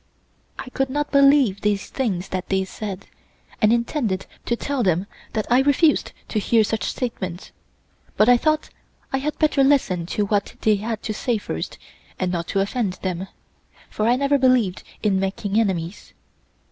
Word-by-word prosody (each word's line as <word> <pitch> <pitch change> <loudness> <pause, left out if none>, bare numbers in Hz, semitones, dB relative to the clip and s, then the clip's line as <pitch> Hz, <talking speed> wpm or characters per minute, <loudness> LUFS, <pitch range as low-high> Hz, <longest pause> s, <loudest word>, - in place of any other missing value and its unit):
I - - -7
could 270 0 -1
not 290 +2 -2
believe 275 -8 +5
these 205 -1 0
things 195 -9 -2
that 185 -1 -4
they 190 0 +1
said, 200 0 -6 0.6
and 215 -1 +5
intended 235 -4 0 0.2
to 235 - +2
tell 280 +2 -2
them 185 -3 +1 0.3
that 215 -2 -1
I 250 +2 +6
refused 290 +3 +3 0.2
to 215 - 0
hear 225 +2 +3
such 220 +1 -2
statements, 185 -8 -4 0.7
but 215 - +5
I 245 - +8
thought 310 +5 +1 0.4
I 270 - +2
had 300 +3 -3
better 300 -3 +3
listen 200 -12 +2
to 205 +3 0
what 200 0 -1
they 215 -1 +3
had 220 +1 -4
to 215 - -2
say 235 +2 0
first 80 - -5 0.4
and 185 -1 -1
not 170 -1 -2
to 195 - +1
offend 200 -1 -1
them, 185 0 -2 0.6
for 215 - 0
I 240 - +4
never 280 +2 +2
believed 250 -8 +3 0.2
in 200 -3 +2
making 195 +2 -1
enemies. 185 -3 -2
215 Hz, 170 wpm, -22 LUFS, 190-260 Hz, 0.7 s, I